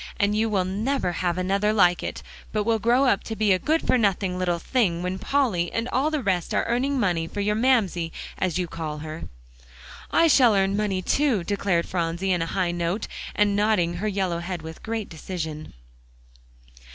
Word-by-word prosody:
And 205 0 +2
you 220 +1 +1
will 195 -3 +1
never 205 +2 -1
have 175 0 -1
another 195 +3 +1
like 180 -5 +4
it, - - -5 0.3
but 210 -1 0
will 225 +1 +1
grow 240 +5 +3
up 200 -7 +2
to 225 - -4
be 215 -2 +2
a 185 - +4
good 315 - 0
for 255 - +3
nothing 190 -3 0
little 175 -2 0
thing 175 -4 0
when 185 +1 -3
Polly 225 -12 0
and 230 +1 -2
all 270 +5 +1
the 305 -4 -2
rest 185 -4 0
are - - +1
earning 260 +4 0
money 175 -7 0
for 205 - -6
your 205 +1 +1
Mamsie, 210 -8 +1 0.3
as 180 -2 0
you 180 - 0
call 160 -2 -5
her." 155 +1 -6 0.8
"I 335 - +4
shall 250 -8 +5
earn 195 0 +2
money 200 -3 -1
too," 265 -8 +1
declared 195 -3 0
Phronsie 175 +2 -1
on 175 - 0
a 165 - -1
high 180 0 0
note, 175 +4 -2 0.3
and 205 -1 +2
nodding 200 -5 +1
her 210 +4 -2
yellow 190 -4 -1
head 170 -1 -5
with 160 0 -9
great 225 -2 -3
decision. 160 -2 -6
195 Hz, 195 wpm, -25 LUFS, 175-220 Hz, 0.8 s, shall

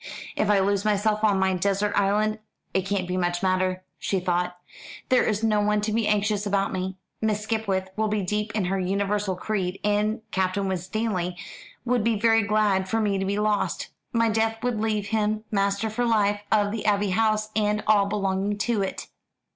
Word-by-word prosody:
"If 210 - 0
I 205 - +5
lose 200 0 +1
myself 215 0 +1
on 205 -2 +4
my 190 0 +2
desert 200 +3 0
island 210 +2 +1 0.3
it 190 0 0
can't 195 -3 -1
much 175 0 -1
matter," 185 0 +1 0.2
she 195 - 0
thought. 180 0 -1 0.5
"There 255 - +5
is 215 0 0
no 215 -2 +3
one 210 0 +2
to 215 +1 -1
be 225 -1 +1
anxious 210 0 +1
about 200 0 0
me. 190 0 -3 0.2
Miss 215 -1 0
Skipwith 210 -4 -1
will 220 +1 0
be 210 -1 -1
deep 210 +3 -2
in 205 -4 +1
her 190 +2 0
universal 200 +1 0
creed, 185 -1 -2
and 210 +2 +1
Captain 190 +1 0
Winstanley 185 -1 -2 0.5
would 245 -2 +1
be 225 -2 +1
very 225 0 +4
glad 205 -2 +1
for 225 - +1
me 205 -3 +1
to 195 - -1
be 200 +1 -1
lost. 210 0 0 0.2
My 230 -2 +2
death 225 +1 0
would 245 -4 0
leave 215 -2 -1
him 215 0 0
master 200 +1 +1
for 220 +3 -2
life 210 -3 +2
of 205 -2 +3
the 220 0 -4
Abbey 205 -1 +2
House 215 +1 +1
and 210 0 +1
all 205 -2 +4
belonging 200 0 -1
to 215 0 0
it." 195 - -4
205 Hz, 185 wpm, -25 LUFS, 195-215 Hz, 0.5 s, I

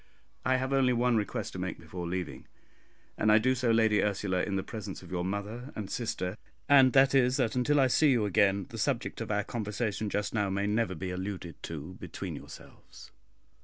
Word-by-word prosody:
I 130 - +2
have 130 +1 -1
only 130 -2 +3
one 120 0 +2
request 105 -2 -2
to - - -6
make - - -3
before 90 -2 -6
leaving, 90 -2 -4 0.7
and 110 - +4
I 105 - +7
do 130 +4 +3
so, 125 -2 0
Lady 110 -2 +4
Ursula, 100 -3 0
in 100 - -2
the 95 - -1
presence 105 -3 -7
of 90 - -13
your 90 -1 -1
mother 105 +7 -4
and 100 -3 -5
sister; 105 -5 -3 0.3
and 135 -3 +6
that 135 0 +5
is, 125 -1 +4
that 120 -4 0
until 145 +4 +2
I 135 - +5
see 145 +4 +4
you 120 -5 +3
again, 100 0 +2
the - - -7
subject - - -1
of - - -4
our 105 -1 +1
conversation 105 -1 -3
just 105 0 -2
now 105 -3 +1
may 100 +1 -1
never 105 -2 0
be 90 +3 -4
alluded 90 -2 -5
to 80 +3 -7
between - - -6
yourselves. - - -13
105 Hz, 200 wpm, -30 LUFS, 95-125 Hz, 0.7 s, I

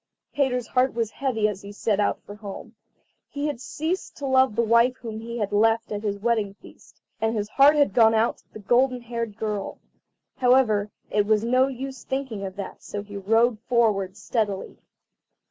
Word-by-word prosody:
Peter's 250 -4 0
heart 255 +1 +1
was 230 -2 -1
heavy 225 -4 0
as 200 -2 -4
he 200 - -9
set 205 0 -1
out 205 - +1
for 205 - -10
home. 205 -2 -9 0.6
He 285 0 -4
had 290 -5 -3
ceased 320 +7 -4
to 285 - -5
love 260 -4 +3
the 235 - +2
wife 235 +3 +4
whom 225 -2 -7
he 235 +1 -6
had 210 -3 -2
left 225 +2 +2
at 205 -1 -3
his 205 -2 -2
wedding 210 -2 0
feast, - - -18 0.2
and 225 +1 +1
his 210 0 -2
heart 280 +5 +6
had 290 -1 +3
gone 225 -2 +5
out 225 +2 +1
to - - -31
the - - -9
golden 245 +4 +2
haired 230 -3 -5
girl. 210 -2 -3 0.6
However, 245 -5 +3 0.2
it 205 -1 +2
was 215 0 +3
no 255 +3 +3
use 270 0 -6
thinking 265 -7 -4
of 190 -1 -5
that, 200 -2 -7
so 205 0 -6
he 205 0 -11
rode 225 +3 +2
forward 215 -5 +1
steadily. 210 -3 -2
225 Hz, 190 wpm, -25 LUFS, 210-250 Hz, 0.6 s, heart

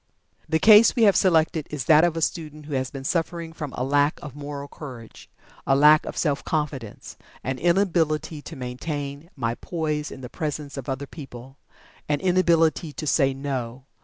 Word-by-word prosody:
The 160 - +3
case 215 +5 +7
we 235 - +3
have 200 -3 +6
selected 160 -4 +2
is 145 -4 -4
that 155 0 +6
of 170 -1 +1
a 165 - 0
student 155 -3 -3
who 150 - -7
has 130 -1 -1
been 135 -1 -8
suffering 165 +2 -2
from 150 -4 -6
"a 125 - -3
lack 145 +2 +2
of 145 -3 -8
Moral 145 -1 -6
Courage 125 -7 -11 0.4
a 135 - +4
lack 150 +2 +6
of - - -6
Self 145 -4 0
Confidence 145 -8 -4 0.3
an 130 0 -3
inability 165 -4 +1
to 165 - -9
maintain 140 +4 -5
my 115 -4 -1
poise 150 +1 -3
in 130 - -10
the 125 - -6
presence 150 -1 -5
of 135 -1 -6
other 135 +1 -3
people 135 -3 -11 0.5
an 145 -1 +1
inability 170 -3 +2
to 155 - -6
say 135 -2 +3
'No!' 130 -2 -4
150 Hz, 180 wpm, -24 LUFS, 135-160 Hz, 0.5 s, case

